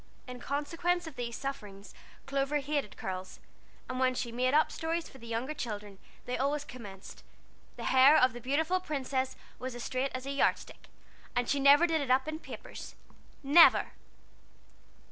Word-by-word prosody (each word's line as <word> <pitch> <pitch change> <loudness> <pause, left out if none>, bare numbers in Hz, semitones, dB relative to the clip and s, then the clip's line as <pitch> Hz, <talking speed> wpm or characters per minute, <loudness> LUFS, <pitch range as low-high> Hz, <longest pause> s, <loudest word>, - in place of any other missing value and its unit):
In 250 0 -8
consequence 335 +7 -1
of 320 -4 -9
these 235 -1 -4
sufferings 210 -8 -7 0.3
Clover 275 +1 0
hated 285 -5 -3
curls, 185 0 -6 0.5
and 255 0 -4
when 255 -1 +2
she 240 -2 -3
"made 250 +2 +1
up" 310 - +4
stories 330 +1 -2
for 265 - -15
the 235 - -11
younger 235 +6 -2
children, 210 -7 -6 0.3
they 250 - -3
always 285 +2 0
commenced: 205 -8 -11 0.5
"The - - -8
hair 265 +4 +6
of 255 -1 +4
the 240 - -8
beautiful 315 +8 +1
princess 265 -5 -2 0.2
was 255 -1 -5
as 240 - -6
straight 260 +1 -1
as 255 0 -5
a 275 - -3
yard 280 - +3
stick, - - -14 0.5
and 245 -1 +1
she 280 - +1
never 285 +4 +7
did 325 -3 +1
it 275 - -4
up 260 +3 +3
in 310 0 -4
papers - - -9 0.5
never!" 295 +5 +6
265 Hz, 170 wpm, -31 LUFS, 245-295 Hz, 0.5 s, never